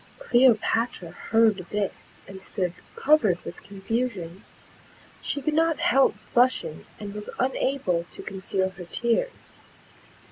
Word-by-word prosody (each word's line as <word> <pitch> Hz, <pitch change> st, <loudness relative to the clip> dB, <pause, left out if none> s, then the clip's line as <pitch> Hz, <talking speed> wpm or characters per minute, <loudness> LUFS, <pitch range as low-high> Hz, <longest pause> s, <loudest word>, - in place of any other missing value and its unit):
Cleopatra 240 Hz, -, +2 dB
heard 225 Hz, -2 st, +3 dB
this, 205 Hz, -2 st, -4 dB
and 190 Hz, 0 st, -9 dB
stood 185 Hz, -3 st, -2 dB, 0.2 s
covered 255 Hz, -, +4 dB
with -, -, -8 dB
confusion; 200 Hz, -3 st, -3 dB, 0.8 s
she 285 Hz, -, -3 dB
could 310 Hz, -, 0 dB
not 325 Hz, 0 st, +3 dB
help 330 Hz, -6 st, +3 dB, 0.2 s
blushing, 245 Hz, -10 st, +2 dB
and 205 Hz, -1 st, -6 dB
was 210 Hz, 0 st, -5 dB
unable 255 Hz, -9 st, 0 dB
to -, -, -11 dB
conceal 190 Hz, -1 st, -2 dB
her 185 Hz, -1 st, -10 dB
tears. 235 Hz, -, 0 dB
220 Hz, 115 wpm, -26 LUFS, 190-260 Hz, 0.8 s, covered